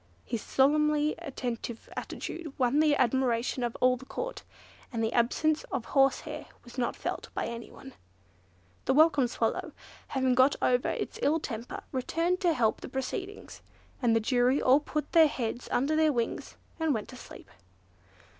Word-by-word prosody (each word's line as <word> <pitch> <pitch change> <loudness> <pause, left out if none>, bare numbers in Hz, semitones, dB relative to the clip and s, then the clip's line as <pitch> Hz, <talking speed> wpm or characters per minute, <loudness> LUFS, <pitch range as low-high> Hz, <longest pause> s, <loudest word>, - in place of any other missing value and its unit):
His 230 - -3
solemnly 300 +2 +2
attentive 245 -7 -5
attitude 320 -5 -6
won 255 +2 +2
the 305 -1 +4
admiration 250 -1 +1
of 240 -1 -2
all 255 0 +4
the 265 - -12
court, - - -5 0.5
and 230 -3 -2
the 225 - 0
absence 300 +6 +2
of 265 -4 -4
horsehair 270 -2 +1 0.2
was 240 - -13
not 250 -2 -1
felt - - -4
by - - -1
anyone. 235 +3 -8 0.9
The 265 - +2
Welcome 300 -4 +5
Swallow, - - -2 0.3
having 260 -1 +1
got 260 +3 +5
over 250 0 +2
its - - -4
ill 315 +3 +2
temper, 230 -5 -6
returned 330 +7 0
to 350 -4 +2
help 230 -6 +1
the - - -7
proceedings; 375 +10 -5 0.4
and 235 -3 +3
the - - +4
jury 250 +4 +2
all 260 +3 +5
put 300 0 -4
their 325 -2 +7
heads 240 -3 -4
under 280 +5 +1
their 310 -1 +4
wings, 235 -4 -3 0.2
and 320 -4 +1
went 215 - -4
to - - -10
sleep. - - -12
265 Hz, 160 wpm, -29 LUFS, 240-300 Hz, 0.9 s, their